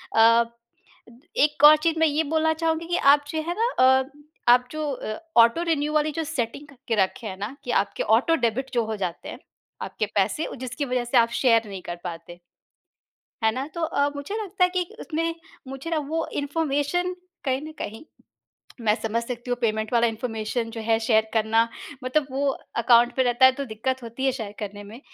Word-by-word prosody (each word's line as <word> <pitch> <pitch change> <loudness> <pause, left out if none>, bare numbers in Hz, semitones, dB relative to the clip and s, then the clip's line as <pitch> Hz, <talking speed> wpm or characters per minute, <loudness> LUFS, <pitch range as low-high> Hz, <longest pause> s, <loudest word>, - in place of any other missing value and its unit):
अ, 230 +1 +6 1.0
एक 295 -1 0
और 305 +1 +10
चीज़ 330 -1 +1
मैं 320 - +5
ये 305 +2 +1
बोलना 320 +1 +1
चाहूँगी 325 +1 -1
कि 350 - 0 0.2
आप 290 0 +1
जो 315 0 -2 0.2
ना 460 +2 +2 0.3
अ, 265 - -2 0.5
आप 250 0 +4
जो 310 -1 -3
अ, 215 -5 -5 0.2
ऑटो 235 +9 +3
रिन्यु 300 -1 0
वाली 305 0 +2
जो 325 +1 -3
सेटिंग 285 -2 -4
करके 265 -4 -4
रखे 220 +5 -5
हैं 190 -2 -6
ना, 210 +7 -5
कि 245 - -3
आपके - - -5
ऑटो 330 +7 +2
डेबिट 255 +4 -2
जो 235 - +2
हो 220 0 -3
जाते 180 -4 -4
हैं - - -8 0.4
आपके 215 - -2
पैसे, 205 +10 +1
जिसकी 255 +3 -4
वजह 250 -2 -1
से 240 +2 +1
आप 230 -1 +5
शेयर 230 -4 +4
नहीं 195 -2 -7
कर 175 - -5
पाते। 175 0 -8 1.1
है 220 - +5
ना? 260 +4 -3
तो 340 - -4
अ, 285 -3 +1
मुझे 285 +8 -5
लगता 385 -2 +1
है 360 - +1
कि 365 0 0 0.2
उसमें 330 +1 -2 0.3
मुझे 270 +5 -6
ना 325 - +1
वो 325 +1 -1
इन्फॉर्मेशन 295 +4 -1 0.3
कहीं 265 -1 0
न 315 - -8
कहीं 220 +2 -6 0.8
मैं 215 -2 +3
समझ 225 +1 -1
सकती 240 +1 -6
हूँ 245 - +1
पेमेंट 220 -1 -1
वाला 235 0 +4
इन्फॉर्मेशन 225 0 -3
जो 225 0 -6
है 225 0 +1
शेयर 220 -1 +2
करना 225 +1 +2 0.4
मतलब 275 +3 +1
वो 275 +2 0 0.3
अकाउंट 235 0 +4
पे 260 - +3
रहता 245 +1 +5
है 260 - +6
तो 280 +2 -5
दिक़्क़त 255 +3 -3
होती 235 +3 -6
है 265 - +3
शेयर 220 -5 -6
करने 205 -1 -6
में। 220 +5 -11
255 Hz, 200 wpm, -24 LUFS, 225-300 Hz, 1.1 s, और